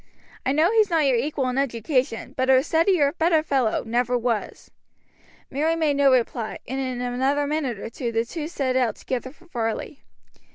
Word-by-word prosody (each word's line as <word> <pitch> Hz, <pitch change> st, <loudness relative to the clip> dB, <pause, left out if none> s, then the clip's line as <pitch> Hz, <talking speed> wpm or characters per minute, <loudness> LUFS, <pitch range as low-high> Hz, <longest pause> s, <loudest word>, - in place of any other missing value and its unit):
I -, -, +3 dB
know 315 Hz, +6 st, +3 dB
he's 435 Hz, -2 st, +3 dB
not 325 Hz, -3 st, +2 dB
your 265 Hz, -2 st, +3 dB
equal 270 Hz, +1 st, -1 dB
in 250 Hz, +2 st, -1 dB
education, 255 Hz, 0 st, -1 dB
but 260 Hz, 0 st, 0 dB
a 260 Hz, 0 st, +6 dB
steadier, 325 Hz, -2 st, +3 dB
better 325 Hz, -2 st, +2 dB
fellow, 265 Hz, -7 st, 0 dB
never 245 Hz, +2 st, 0 dB
was." 235 Hz, -3 st, -3 dB, 0.8 s
Mary 310 Hz, +4 st, +1 dB
made 305 Hz, -4 st, +1 dB
no 280 Hz, -1 st, +5 dB
reply, 235 Hz, -3 st, 0 dB
and 265 Hz, +1 st, -3 dB
in 255 Hz, -2 st, -3 dB
another 265 Hz, +4 st, 0 dB
minute 285 Hz, -6 st, -2 dB, 0.2 s
the 230 Hz, -3 st, -1 dB
two 305 Hz, +5 st, -5 dB
set 270 Hz, -6 st, -2 dB
out 245 Hz, -4 st, +1 dB
together 260 Hz, 0 st, -4 dB
for 345 Hz, +4 st, -22 dB
Varley. 240 Hz, -1 st, -4 dB
265 Hz, 170 wpm, -24 LUFS, 245-305 Hz, 0.8 s, a